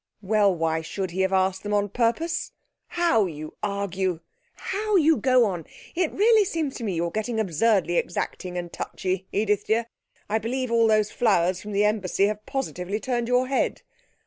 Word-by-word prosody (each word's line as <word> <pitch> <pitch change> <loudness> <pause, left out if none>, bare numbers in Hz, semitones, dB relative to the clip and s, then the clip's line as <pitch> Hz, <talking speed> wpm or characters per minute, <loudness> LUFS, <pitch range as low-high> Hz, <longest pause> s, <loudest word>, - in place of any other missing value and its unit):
'Well, 200 -1 +3
why 160 -1 0
should 185 +3 -4
he 185 +2 -1
have 190 0 +1
asked 190 0 +1
them 210 0 -1
on 205 0 +1
purpose? 250 - -1 0.3
How 335 - +2
you 155 -2 -7
argue! 195 -4 -2 0.3
How 420 +2 -2
you 320 -3 +5
go 255 -3 +4
on! 175 -6 -3 0.3
It 350 -2 0
really 435 +1 +4
seems 320 -7 -2
to 240 - -7
me 200 -5 -2
you're 170 +1 -1
getting 220 +3 -2
absurdly 190 -2 +2
exacting 180 +1 -3
and 175 -1 -5
touchy, 185 0 -3
Edith 205 0 0
dear. 225 +1 +2 0.4
I 220 +2 0
believe 250 +2 -2
all 230 -1 +4
those 215 -1 +2
flowers 185 -5 +2
from 210 - -7
the 205 +1 +2
embassy 200 -2 +1
have 210 +1 -2
positively 210 -7 -3
turned 240 -1 -2
your 250 +1 +3
head. 265 +1 -1
210 Hz, 175 wpm, -25 LUFS, 185-245 Hz, 0.4 s, you